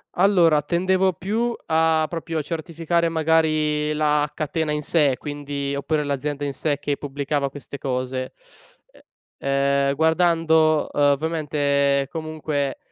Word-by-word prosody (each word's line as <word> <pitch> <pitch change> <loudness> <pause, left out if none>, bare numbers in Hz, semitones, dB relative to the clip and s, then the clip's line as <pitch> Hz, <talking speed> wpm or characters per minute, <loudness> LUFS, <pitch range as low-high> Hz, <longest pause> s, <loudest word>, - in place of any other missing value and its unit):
Allora, 175 -5 +4
tendevo 185 +4 +1
più 225 +7 -2
a 160 0 +3
proprio 165 -1 -3
a - - 0
certificare 165 +2 -1
magari 155 -2 +1
la 150 -1 +1
catena 155 0 -2
in 150 - -2
sé 145 -3 +2
quindi 145 -1 -4
oppure 150 +2 -1
l'azienda 145 +1 -3
in 140 - -1
sé 145 +1 -1
che 145 -1 -2
pubblicava 140 0 -2
queste 140 0 -9
cose, 130 -1 -3 1.0
e 140 - -6 0.4
ehm, 140 - +1
guardando 160 -1 +3
ovviamente 145 -1 +1
comunque 155 -4 -3
150 Hz, 120 wpm, -23 LUFS, 145-160 Hz, 1.0 s, Allora